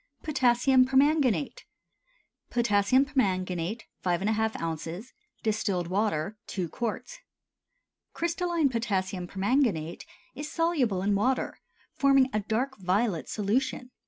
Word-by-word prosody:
POTASSIUM 260 Hz, -2 st, +3 dB
PERMANGANATE. 280 Hz, -, +2 dB, 0.9 s
Potassium 235 Hz, +2 st, +3 dB
permanganate 190 Hz, -, -1 dB, 0.2 s
5½ 215 Hz, +5 st, 0 dB
oz. 165 Hz, +7 st, -5 dB, 0.3 s
Distilled 205 Hz, -5 st, -1 dB
water 200 Hz, 0 st, -1 dB
2 180 Hz, -4 st, -3 dB
qts. 240 Hz, -, -4 dB, 0.9 s
Crystalline 340 Hz, -2 st, 0 dB
potassium 195 Hz, -6 st, -2 dB
permanganate 195 Hz, -, 0 dB, 0.3 s
is 295 Hz, +3 st, -6 dB
soluble 275 Hz, -, +1 dB
in 205 Hz, +1 st, +2 dB
water, 255 Hz, +6 st, 0 dB, 0.3 s
forming 275 Hz, -1 st, +4 dB
a 215 Hz, -, +2 dB
dark 230 Hz, +5 st, -2 dB
violet 190 Hz, -1 st, 0 dB
solution. 250 Hz, +4 st, -1 dB
220 Hz, 95 wpm, -28 LUFS, 190-265 Hz, 0.9 s, forming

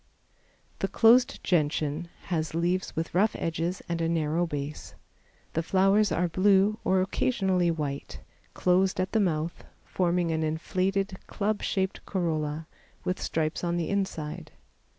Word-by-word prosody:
The -, -, 0 dB
closed 240 Hz, +2 st, +4 dB
Gentian 155 Hz, -1 st, 0 dB
has 160 Hz, -3 st, -2 dB
leaves 175 Hz, +2 st, 0 dB
with 165 Hz, +1 st, -3 dB
rough 205 Hz, +5 st, +3 dB
edges 165 Hz, +2 st, -2 dB
and 170 Hz, -1 st, -2 dB
a 165 Hz, -, +1 dB
narrow 165 Hz, +1 st, +1 dB
base. 145 Hz, -1 st, -5 dB, 0.6 s
The 165 Hz, -, +1 dB
flowers 195 Hz, +4 st, +3 dB
are 175 Hz, +2 st, +1 dB
blue 195 Hz, +4 st, +3 dB
or 185 Hz, 0 st, +3 dB
occasionally 190 Hz, -3 st, +1 dB
white, 140 Hz, -, -3 dB, 0.4 s
closed 185 Hz, +1 st, +2 dB
at 185 Hz, 0 st, 0 dB
the 220 Hz, -, +2 dB
mouth, 165 Hz, -4 st, -1 dB, 0.2 s
forming 175 Hz, -2 st, 0 dB
an 160 Hz, 0 st, 0 dB
inflated, 185 Hz, +5 st, -1 dB
club 210 Hz, 0 st, -1 dB
shaped 190 Hz, -1 st, -1 dB
corolla, 160 Hz, -4 st, -1 dB, 0.4 s
with 185 Hz, -, -2 dB
stripes 155 Hz, +1 st, -1 dB
on 175 Hz, 0 st, 0 dB
the 170 Hz, -, -1 dB
inside. 190 Hz, -7 st, -3 dB
175 Hz, 135 wpm, -28 LUFS, 160-190 Hz, 0.6 s, closed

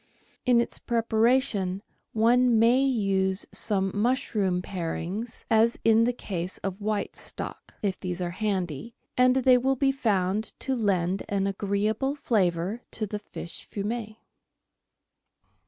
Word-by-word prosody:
In 245 Hz, -1 st, +5 dB
its 235 Hz, -, -2 dB
preparation, 225 Hz, -4 st, +1 dB, 0.3 s
one 235 Hz, +2 st, +4 dB
may 235 Hz, +4 st, +5 dB
use 195 Hz, -7 st, +1 dB
some 195 Hz, -2 st, +1 dB
mush 245 Hz, +6 st, 0 dB
room 185 Hz, -4 st, +1 dB
parings, 190 Hz, +6 st, -4 dB
as 225 Hz, +1 st, +3 dB
in 225 Hz, 0 st, +5 dB
the 245 Hz, -, +2 dB
case 185 Hz, -6 st, -5 dB
of 195 Hz, +1 st, -4 dB
white 210 Hz, 0 st, -2 dB
stock, -, -, -8 dB
if 195 Hz, -2 st, -1 dB
these 180 Hz, -1 st, -4 dB
are 175 Hz, -1 st, -2 dB
handy, 190 Hz, -, -3 dB, 0.2 s
and 250 Hz, 0 st, +4 dB
they 255 Hz, -1 st, +5 dB
will 265 Hz, +2 st, +1 dB
be 270 Hz, +1 st, +2 dB
found 210 Hz, -5 st, 0 dB
to 265 Hz, -, -1 dB
lend 195 Hz, -5 st, +1 dB
an 195 Hz, -1 st, 0 dB
agreeable 205 Hz, +7 st, 0 dB
flavour 195 Hz, -, 0 dB
to 215 Hz, -, -3 dB
the 210 Hz, 0 st, -4 dB
fish 190 Hz, -4 st, -8 dB
fumet. 215 Hz, +1 st, -4 dB
215 Hz, 135 wpm, -27 LUFS, 190-235 Hz, 0.3 s, In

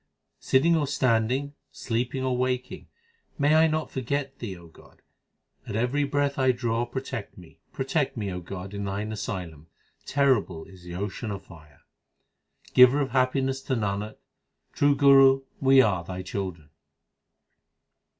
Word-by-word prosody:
Sitting 160 Hz, +6 st, +3 dB
or 150 Hz, -3 st, 0 dB
standing, 130 Hz, +1 st, +1 dB, 0.2 s
sleeping 125 Hz, +3 st, -3 dB
or 130 Hz, -1 st, 0 dB
waking 125 Hz, 0 st, -2 dB, 0.5 s
may 145 Hz, +1 st, +3 dB
I 160 Hz, +1 st, +6 dB
not 155 Hz, 0 st, -2 dB
forget 135 Hz, +2 st, -3 dB
Thee 100 Hz, -6 st, -6 dB
O 85 Hz, -, -14 dB
God, 80 Hz, -, -19 dB, 0.6 s
at -, -, -5 dB
every 125 Hz, +6 st, +1 dB
breath 140 Hz, 0 st, -1 dB
I 130 Hz, -1 st, +4 dB
draw! 120 Hz, 0 st, -1 dB
Protect 130 Hz, -4 st, -6 dB
me, 90 Hz, -3 st, -15 dB
protect 135 Hz, 0 st, -1 dB
me, 100 Hz, -3 st, -3 dB
O 90 Hz, -, -4 dB
God, 95 Hz, +2 st, -8 dB
in 100 Hz, 0 st, -4 dB
Thine 100 Hz, +2 st, -3 dB
asylum! 90 Hz, -7 st, -6 dB, 0.4 s
terrible 130 Hz, -, +1 dB
is 95 Hz, -2 st, -15 dB
the 90 Hz, 0 st, -8 dB
ocean 105 Hz, +4 st, -4 dB
of 100 Hz, -1 st, -5 dB
fire. 75 Hz, -5 st, -17 dB, 0.9 s
Giver 125 Hz, +3 st, +7 dB
of 135 Hz, -3 st, -1 dB
happiness 130 Hz, +1 st, +1 dB
to 130 Hz, -, -2 dB
Nanak; 105 Hz, -1 st, -2 dB, 0.6 s
true 145 Hz, 0 st, +3 dB
Guru, 135 Hz, -1 st, +6 dB, 0.2 s
we 135 Hz, -1 st, +6 dB
are 90 Hz, -6 st, 0 dB
Thy 90 Hz, +1 st, -6 dB
children. 90 Hz, -6 st, -5 dB
125 Hz, 145 wpm, -26 LUFS, 100-135 Hz, 0.9 s, Giver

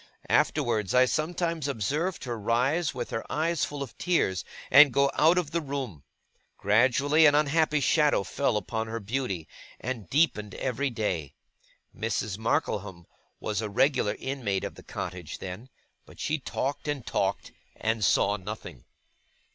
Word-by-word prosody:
Afterwards, 110 Hz, -3 st, +1 dB
I 130 Hz, 0 st, +7 dB
sometimes 165 Hz, +2 st, -1 dB
observed 150 Hz, -, -1 dB
her 120 Hz, -4 st, -4 dB
rise, 130 Hz, +10 st, +1 dB
with 120 Hz, -1 st, -4 dB
her 115 Hz, -, -2 dB
eyes 160 Hz, +3 st, 0 dB
full 145 Hz, -1 st, -3 dB
of 130 Hz, -, -10 dB
tears, 125 Hz, -, +1 dB, 0.3 s
and 145 Hz, 0 st, +9 dB
go 140 Hz, +2 st, +3 dB
out 165 Hz, +4 st, +4 dB
of 165 Hz, -5 st, 0 dB
the 170 Hz, 0 st, 0 dB
room. 135 Hz, -, -5 dB, 0.6 s
Gradually, 130 Hz, +9 st, +4 dB
an 145 Hz, -, +5 dB
unhappy 150 Hz, +1 st, +2 dB
shadow 150 Hz, -5 st, +3 dB
fell 115 Hz, +3 st, 0 dB
upon 110 Hz, +2 st, -3 dB
her 115 Hz, +1 st, -4 dB
beauty, 105 Hz, -6 st, -3 dB, 0.3 s
and 115 Hz, -7 st, -5 dB
deepened 105 Hz, -, +1 dB
every 130 Hz, +2 st, -1 dB
day. 95 Hz, -, -3 dB, 0.6 s
Mrs. 105 Hz, -1 st, -2 dB
Markleham 100 Hz, -5 st, -1 dB, 0.3 s
was 105 Hz, 0 st, -2 dB
a 110 Hz, -, -3 dB
regular 115 Hz, -1 st, +2 dB
inmate 120 Hz, -8 st, -2 dB
of -, -, -4 dB
the -, -, -13 dB
cottage 90 Hz, -3 st, -6 dB
then; 95 Hz, +8 st, -8 dB, 0.4 s
but -, -, -16 dB
she 155 Hz, 0 st, -1 dB
talked 140 Hz, +2 st, -3 dB
and 145 Hz, -4 st, -2 dB
talked, -, -, -1 dB, 0.2 s
and 110 Hz, -1 st, -1 dB
saw 100 Hz, +1 st, +3 dB
nothing. 100 Hz, -, -8 dB
125 Hz, 145 wpm, -28 LUFS, 105-145 Hz, 0.6 s, and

